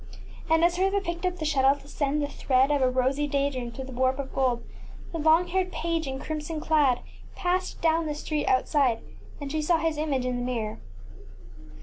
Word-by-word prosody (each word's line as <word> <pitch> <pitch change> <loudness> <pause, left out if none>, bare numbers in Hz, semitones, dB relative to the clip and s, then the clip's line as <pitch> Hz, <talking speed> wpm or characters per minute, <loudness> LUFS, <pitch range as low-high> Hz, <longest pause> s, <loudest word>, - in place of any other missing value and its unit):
And 325 +1 +4
as 350 0 +2
Hertha 390 +2 +2
picked 345 -1 -3
up 360 0 -3
the 315 - -4
shuttle 275 -2 +4
to 285 - -16
send 290 0 -1
the - - 0
thread 270 -1 +2
of 290 -2 +2
a 255 - +4
rosy 260 +3 +1
day 280 0 +1
dream 250 -3 -4
through 265 +3 -7
the 265 - -9
warp 260 +1 +1
of 275 -1 -5
gold, 255 -3 +1 0.5
the 330 - -4
long 320 +3 +4
haired 370 0 0
page 330 -3 -2
in 265 0 -3
crimson 310 +2 -4
clad 295 -5 +2 0.3
passed 365 +1 -1
down 325 0 +2
the 300 - -2
street 300 0 -2
outside, 255 -2 +2 0.4
and 285 -2 -5
she 310 0 0
saw 330 +2 +3
his 320 -1 -1
image 280 -5 0
in 250 -1 -1
the 245 - -2
mirror. 230 -4 -3
295 Hz, 210 wpm, -27 LUFS, 265-325 Hz, 0.5 s, And